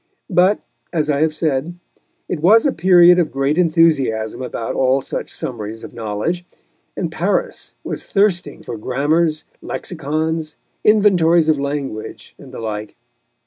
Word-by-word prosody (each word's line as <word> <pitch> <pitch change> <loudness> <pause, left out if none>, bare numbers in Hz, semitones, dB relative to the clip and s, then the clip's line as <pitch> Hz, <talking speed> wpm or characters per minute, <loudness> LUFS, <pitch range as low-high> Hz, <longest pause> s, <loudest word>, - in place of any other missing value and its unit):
But, 185 +4 +4 0.3
as 155 -3 0
I 140 0 0
have 155 -1 +1
said, 155 +1 -1 0.5
it 170 - -3
was 215 - +5
a 285 - +3
period 180 -1 +6
of 165 -4 0
great 135 +2 0
enthusiasm 150 -11 +2
about 115 -2 -4
all 130 +1 +2
such - - -5
summaries 110 -3 -6
of - - -9
knowledge, 115 +10 -3 0.5
and - - -2
Paris - - -2
was - - -5
thirsting 180 -7 0
for 115 - -6
grammars, 150 +6 0 0.2
lexicons, 160 -1 -3 0.3
inventories 175 -6 +4
of 155 -2 +2
language 140 -6 -5
and - - -13
the - - -8
like. 110 -1 -5
155 Hz, 140 wpm, -19 LUFS, 130-175 Hz, 0.5 s, period